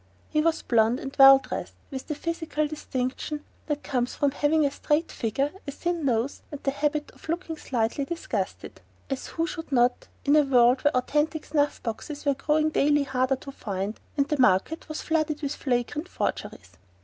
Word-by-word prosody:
He 305 - +3
was 330 +1 +1
blond 230 +1 +3
and 270 0 -7
well 270 0 +11
dressed, 270 - -6 0.2
with 265 -1 -6
the 300 - -2
physical 325 -1 -2
distinction 295 0 -4 0.2
that 295 -1 -2
comes 250 -3 -1
from 285 -1 +2
having 295 +2 +2
a 280 - +1
straight 300 +3 0
figure, 270 +6 -1 0.2
a - - -2
thin 340 +1 -2
nose, 245 +1 0
and 290 - -6
the 275 - +1
habit 295 +1 -1
of - - -17
looking 335 -1 -2
slightly 245 -2 -1
disgusted 335 +4 -4 0.3
as 270 - -3
who 330 - -1
should 325 -2 -6
not, 245 -1 +2 0.2
in 285 +1 +5
a 305 - +7
world 255 -2 +4
where 290 -3 +3
authentic 300 +4 0
snuff 290 -1 0
boxes 285 +7 -5
were 285 - +4
growing 305 +3 +1
daily 290 0 +3
harder 260 0 +1
to 275 +1 -9
find, 200 -3 -4 0.2
and 280 -1 +2
the 300 -1 -1
market 255 - +2
was 310 - -4
flooded 310 -2 0
with 285 0 -1
flagrant 265 +5 -1
forgeries? - - -4
285 Hz, 185 wpm, -26 LUFS, 255-305 Hz, 0.3 s, well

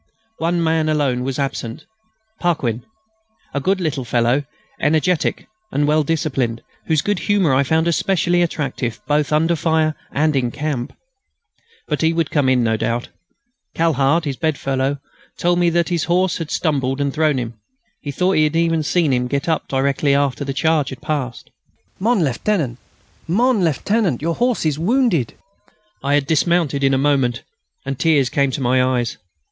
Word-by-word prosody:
One 170 +1 0
man 160 -1 +1
alone 140 -5 +1
was 130 0 -3
absent; 135 -5 -4 0.5
Paquin, 130 -10 -1 0.7
a 140 - 0
good 190 +7 +1
little 155 -6 -2
fellow, 120 +4 +1 0.3
energetic 160 +3 +1 0.2
and 145 +1 +1
well 155 +1 +3
disciplined, 135 -7 -1 0.2
whose 155 -2 +2
good 205 -3 0
humour 195 -9 +2
I 130 - +4
found 160 +4 +1
especially 175 0 +1
attractive 135 -9 -2
both 150 0 +1
under 165 +3 +2
fire 160 -1 +1 0.2
and 155 +1 +1
in 125 -3 +1
camp. 140 -1 -3 1.0
But 150 - -1
he 160 0 +3
would 165 -3 -1
come 145 -4 +2
in, 125 -2 +3
no 110 -1 +1
doubt. 115 +2 -2 0.7
Cahard, 160 0 +2
his 140 -3 -3
bed 155 -3 0
fellow, 135 +1 -1 0.4
told 175 0 +1
me 175 -1 +3
that 170 0 +1
his 170 -3 0
horse 180 +1 +1
had 165 -2 -5
stumbled 135 -4 0
and 140 -1 -1
thrown 155 -2 +2
him. 115 -3 -5 0.4
He 145 - -6
thought 180 +7 +1
he 155 -5 +3
had 150 +1 -1
even 165 -1 +2
seen 155 -1 +1
him 125 0 0
get 140 +4 -2
up 160 -1 0
again 135 -1 +1
directly 140 +1 +2
the 140 -1 0
charge 150 +1 +1
had 130 - -9
passed. 145 -5 -4 0.5
"Mon 215 -1 +2
Lieutenant,... 135 - -1 0.5
mon 225 +4 +2
Lieutenant, 175 - +1
your 165 +3 -1
horse 245 -1 0
is 150 -1 0
wounded." 195 - +1 0.7
I 140 +1 +2
had 145 -1 +1
dismounted 160 -2 +1
in 135 0 +3
a - - +2
moment, 135 -4 +1 0.4
and 135 -1 -4
tears 145 -6 +3
came 140 -2 +2
to 135 - -4
my 125 0 +3
eyes. 125 -2 0
150 Hz, 170 wpm, -20 LUFS, 135-165 Hz, 1.0 s, I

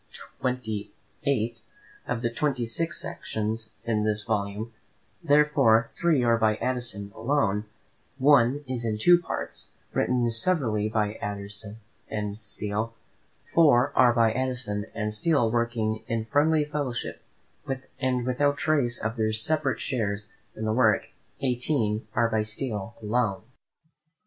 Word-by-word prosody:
XVIII. 110 -5 -2 1.2
Of 120 -1 -2
the 120 - +1
twenty 135 -3 0
six 165 +9 -2
sections 110 +1 -3
in 110 -2 0
this 105 0 0
volume, 105 0 -2 0.5
therefore, 145 -7 +4
three 165 -7 +2
are 115 -1 +3
by 110 -1 +3
Addison 120 -5 -3
alone; 110 -6 0 0.5
one 140 0 +4
is 125 -2 -2
in 110 -2 -1
two 175 +10 +6
parts, - - -5 0.3
written 125 -1 +2
severally 115 - +1
by 105 -1 -1
Addison 105 +1 -5 0.3
and 105 -2 -3
Steele; 105 +1 -4 0.6
four 140 -4 +5
are 125 -2 +6
by 115 -2 +3
Addison 125 -5 -2
and 105 -1 -2
Steele 120 0 +2
working 115 -2 0
in 115 -1 -1
friendly 150 +4 +3
fellowship, 145 -5 -3 0.8
and 130 -2 0
without 145 +3 +1
trace 140 -6 +1
of 110 +2 -3
their 110 -1 +1
separate 135 +5 0
shares 105 -4 -2 0.3
in 110 - -4
the 110 - +1
work; 110 -3 +3 0.3
eighteen 120 -4 0
are 115 0 +4
by 110 -1 +1
Steele 110 -1 -4
alone. 105 -2 0
115 Hz, 125 wpm, -27 LUFS, 110-130 Hz, 1.2 s, two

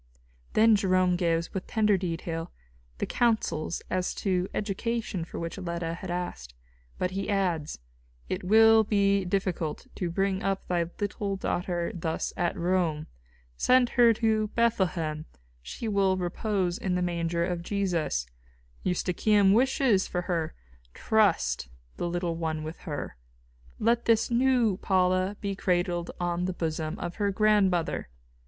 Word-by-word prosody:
Then 220 0 +6
Jerome 185 -3 +2
gives, 170 -1 0
with 190 - -4
tender 210 -2 +3
detail, 165 -2 -3 0.5
the - - -1
counsels 220 -9 0
as 185 -1 -1
to 185 -2 0
education 210 -2 -2
for 165 - -8
which 170 +3 -5
Leta 170 -2 -3
had 180 +2 -7
asked. 175 - -5 0.4
But 180 - -1
he 195 +1 -3
adds: 180 -7 0 0.5
"It - - -3
will 220 +3 +6
be 200 -2 +2
difficult 180 -4 -2
to 180 - -3
bring 195 +2 0
up 195 0 -2
thy 175 -2 0
little 205 -1 -2
daughter 175 -2 -2
thus 165 -2 -3
at 175 - -1
Rome. 170 -3 0 0.5
Send 250 - +4
her 240 -2 +5
to 220 -1 +1
Bethlehem; 180 -9 0 0.3
she 145 - -6
will 195 -3 +2
repose 180 0 -1
in 185 -2 -1
the 180 - 0
manger 170 -1 0
of 175 -1 -2
Jesus. 170 - -1 0.6
Eustochium 195 +3 +3
wishes 245 -4 +3
for 180 - -2
her; 165 -3 -2 0.4
trust 180 - +2 0.3
the 175 - -2
little 175 -1 -2
one 160 -2 -2
with 155 +2 -7
her. 145 - -5 0.6
Let 235 +2 +1
this 230 +1 +3
new 240 -5 +3
Paula 185 +1 +1
be 200 -1 -2
cradled 175 -2 0
on 175 0 -1
the 185 - -2
bosom 160 -2 -3
of 175 - -5
her 205 -2 +1
grandmother. 195 - +2
185 Hz, 140 wpm, -28 LUFS, 170-205 Hz, 0.6 s, Then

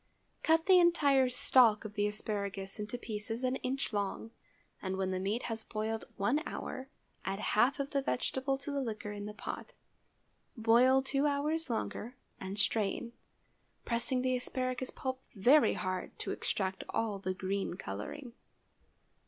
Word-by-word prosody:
Cut 320 0 +3
the 375 -1 +7
entire 285 -7 +5
stalk 245 -3 +4
of 210 - -6
the 205 -1 +1
asparagus 200 -2 -3
into 210 +3 -3
pieces 225 +1 -4
an 255 +1 +1
inch 260 -2 -2
long, 205 +2 -2 0.5
and 190 0 -2
when 190 -1 0
the 185 - -1
meat 205 +5 -1
has 225 -1 -3
boiled 220 0 -3
one 240 +10 +2
hour, 265 +1 -5 0.3
add 195 0 -2
half 245 +7 +2
of 280 +1 -2
the 275 - +1
vegetable 270 +1 0
to 280 +2 -6
the 280 -1 0
liquor 215 -4 -4
in 205 0 -5
the 210 - -6
pot. - - -6 0.8
Boil 245 +4 +5
two 275 +2 +2
hours 300 +2 0
longer 235 +1 -3 0.2
and 190 +1 -5
strain, 215 +2 0 0.7
pressing 250 +2 0
the 255 0 +2
asparagus 255 0 -2
pulp 260 -1 -4
very 255 +10 +6
hard 185 -1 -3
to - - -3
extract 190 -1 -2
all 215 -3 -1
the 185 -1 -2
green 195 0 -2
coloring. 180 - -6
230 Hz, 155 wpm, -33 LUFS, 205-265 Hz, 0.8 s, the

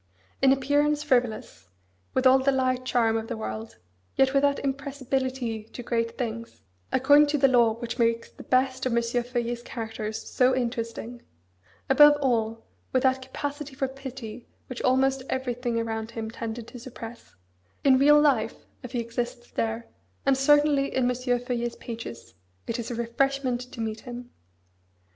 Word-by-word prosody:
In 265 0 +6
appearance, 290 +2 +2
frivolous; 245 - -1 0.5
with 260 - +1
all 260 +1 +7
the 270 +1 +2
light 255 -1 0
charm 230 -3 +2
of 225 0 -4
the 235 - -4
world, 110 - -6 0.4
yet 265 0 +3
with 275 - +4
that 285 0 +3
impressibility 265 -4 -2
to 245 +2 -9
great 230 -1 -1
things, 230 -1 -5 0.3
according 285 +3 +6
to 295 +1 +1
the 275 -1 +5
law 240 -3 +4
which 235 +1 -6
makes 230 0 +2
the - - -13
best 260 0 +1
of 235 -2 0
M. 235 - +2
Feuillet's 240 0 -2
characters 220 -3 -5
so 255 0 +3
interesting; 235 -1 -3 0.7
above 295 +2 +7
all, 230 -4 0 0.3
with 255 - +1
that 260 0 +3
capacity 285 +2 -5
for 270 0 0
pity 260 -4 -8 0.2
which 255 - -7
almost 265 +1 +2
everything 245 -2 -1
around 225 -1 -3
him 225 -1 -5
tended 230 0 -6
to 245 - -10
suppress; 235 -1 -10 0.5
in 265 -2 +5
real 295 +2 +7
life, 275 -7 +1 0.2
if 250 - -9
he 245 - 0
exists 240 +1 -4
there, 225 +1 -2 0.4
and 275 -1 +4
certainly 290 0 +3
in 260 - +2
M. - - -2
Feuillet's 245 -1 -1
pages, 225 - -8 0.3
it 230 +1 -3
is 230 - -4
a 240 - -3
refreshment 250 +2 0
to - - -10
meet 220 -1 -3
him. 245 +1 -9
245 Hz, 160 wpm, -26 LUFS, 230-265 Hz, 0.7 s, all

